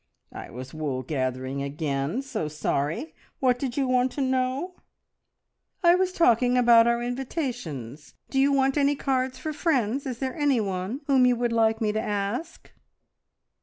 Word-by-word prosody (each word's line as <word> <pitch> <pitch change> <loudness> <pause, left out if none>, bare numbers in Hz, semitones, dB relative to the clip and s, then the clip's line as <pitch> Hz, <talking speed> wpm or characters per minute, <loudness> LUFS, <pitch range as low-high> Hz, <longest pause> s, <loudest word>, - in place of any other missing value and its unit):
"I - - -8
was 130 +2 -9
wool 145 -5 -3
gathering 130 0 -3
again. 140 - -2
So 235 - -3
sorry! 155 - -2 0.3
What 250 -2 +2
did 255 -2 -3
you 270 -2 +1
want 255 0 +2
to 285 - -3
know?" 260 +6 -1 1.1
"I 345 0 +7
was 370 0 +2
talking 250 - +3
about 235 -2 +6
our 235 0 +1
invitations. 240 - -5 0.2
Do 270 - +1
you 275 +1 +4
want 270 +1 +2
any 285 0 +3
cards 260 -2 -1
for 310 - -4
friends? 275 - 0
Is 250 -3 -4
there 260 0 -3
anyone 230 - 0
whom 265 -3 +4
you 250 - +3
would 240 0 -1
like 225 -1 +2
me 215 -1 +1
to 215 +1 -1
ask?" 210 +10 -4
245 Hz, 160 wpm, -26 LUFS, 180-270 Hz, 1.1 s, I